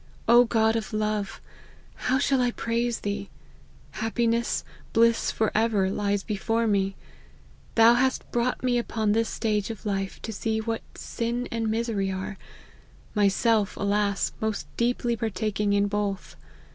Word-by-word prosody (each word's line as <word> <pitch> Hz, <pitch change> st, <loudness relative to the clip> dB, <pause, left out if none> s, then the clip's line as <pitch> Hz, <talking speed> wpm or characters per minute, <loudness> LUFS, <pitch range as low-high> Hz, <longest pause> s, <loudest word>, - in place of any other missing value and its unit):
O 240 Hz, +1 st, +7 dB
God 220 Hz, -1 st, +2 dB
of 225 Hz, -1 st, -3 dB
love, 215 Hz, -2 st, -1 dB, 0.5 s
how 260 Hz, -, 0 dB
shall 270 Hz, -1 st, +2 dB
I 245 Hz, -, +3 dB
praise 235 Hz, 0 st, -1 dB
Thee! 205 Hz, -1 st, -3 dB, 0.6 s
happiness, 230 Hz, +1 st, 0 dB, 0.3 s
bliss 230 Hz, 0 st, +4 dB
for 220 Hz, -1 st, 0 dB
ever, 210 Hz, -4 st, +2 dB
lies 200 Hz, -1 st, 0 dB
before 225 Hz, +2 st, 0 dB
me. 195 Hz, -2 st, +1 dB, 0.8 s
Thou 230 Hz, +1 st, +7 dB
hast 260 Hz, +2 st, 0 dB
brought 240 Hz, +2 st, 0 dB
me 245 Hz, -1 st, +2 dB
upon 220 Hz, -3 st, -1 dB
this 225 Hz, +1 st, +1 dB
stage 210 Hz, -3 st, -1 dB
of 225 Hz, -1 st, -7 dB
life 195 Hz, -2 st, -2 dB
to 225 Hz, -, -4 dB
see 220 Hz, +2 st, -1 dB
what 225 Hz, 0 st, -2 dB
sin 240 Hz, +1 st, -3 dB
and 225 Hz, -1 st, -1 dB
misery 220 Hz, -3 st, 0 dB
'are; 190 Hz, +1 st, -4 dB, 0.7 s
myself, 210 Hz, +1 st, +2 dB
alas! 200 Hz, 0 st, +1 dB
most 220 Hz, -1 st, -1 dB
deeply 240 Hz, 0 st, +1 dB
partaking 210 Hz, -1 st, -1 dB
in 200 Hz, 0 st, +3 dB
both. 205 Hz, -1 st, -2 dB
220 Hz, 140 wpm, -26 LUFS, 205-230 Hz, 0.8 s, O